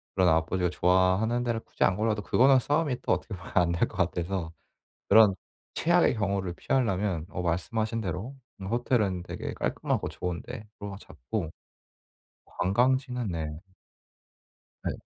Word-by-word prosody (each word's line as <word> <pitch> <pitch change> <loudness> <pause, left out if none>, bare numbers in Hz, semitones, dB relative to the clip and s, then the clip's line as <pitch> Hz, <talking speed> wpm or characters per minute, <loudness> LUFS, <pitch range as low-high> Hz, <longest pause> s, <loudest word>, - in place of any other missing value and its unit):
그런 95 -2 +4
아버지가 85 +3 +1
좋아하는 95 +7 +2
데를 120 -2 -1
굳이 - - -3
안 95 - +4
골라도 105 0 0
그거는 130 +5 +5
싸움이 145 0 0
또 - - -1
어떻게 105 - -3
보면 90 -2 -11
안 90 -2 +4
될 85 - +1
것 - - -12
같아서 90 -1 -1 0.6
그런 105 -1 +7 0.4
최악의 - - +3
경우를 100 -3 -1
피하려면 95 -8 0
어 90 - -4
말씀하신 110 +7 -1
대로 100 +6 -4 0.3
음 95 - -6
호텔은 105 -5 0
되게 - - -5
깔끔하고 - - -1
좋은 90 -1 -4
데로 105 -4 -8
잡고 80 - -5 1.0
관광지는 125 +4 +1
네. 80 -2 -4 1.2
네. - - -1
100 Hz, 305 characters per minute, -28 LUFS, 90-115 Hz, 1.2 s, 그런